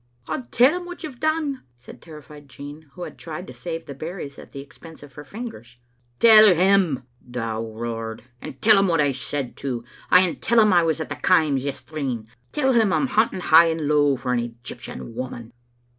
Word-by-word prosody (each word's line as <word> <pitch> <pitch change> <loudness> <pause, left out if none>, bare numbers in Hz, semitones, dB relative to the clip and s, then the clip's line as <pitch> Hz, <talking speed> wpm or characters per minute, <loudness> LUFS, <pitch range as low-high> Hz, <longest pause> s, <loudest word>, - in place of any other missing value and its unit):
"I'll 250 - -4
tell 270 +9 +4
him 350 - -10
what 355 0 -9
you've 280 -6 -8
done," 310 -3 -1 0.2
said 120 - -14
terrified 150 -2 -13
Jean, 145 +2 -11
who 180 - -8
had - - -9
tried 165 +2 -7
to - - -11
save 165 -1 -6
the 140 - -8
berries 155 0 -7
at - - -13
the 140 - -8
expense 160 +3 -13
of 145 -2 -14
her 145 - -10
fingers. 145 - -9 0.4
"Tell 215 -4 +8
him," 180 -7 +2 0.3
Dow 115 -2 -3
roared; 115 0 -6 0.2
"and 135 - -9
tell 215 -2 +7
him 195 - +3
what 165 -3 +1
I 145 -2 +3
said 135 0 -4
too. 125 -4 -4 0.3
Ay, 180 - +7
and 180 -3 -1
tell 235 0 +3
him 215 -3 +5
I 175 - +5
was 165 -1 0
at 160 - -5
the - - -4
Kaims 155 -7 +2
yestreen. 135 -4 -4 0.3
Tell 265 -3 +1
him 225 -4 +3
I'm 275 - +2
hunting 220 -6 +1
high 165 0 +7
and 165 0 -2
low 145 -1 +2
for 125 0 -2
an 120 - +1
Egyptian 120 - -8
woman." 120 -1 -7
155 Hz, 205 wpm, -23 LUFS, 130-195 Hz, 0.4 s, Tell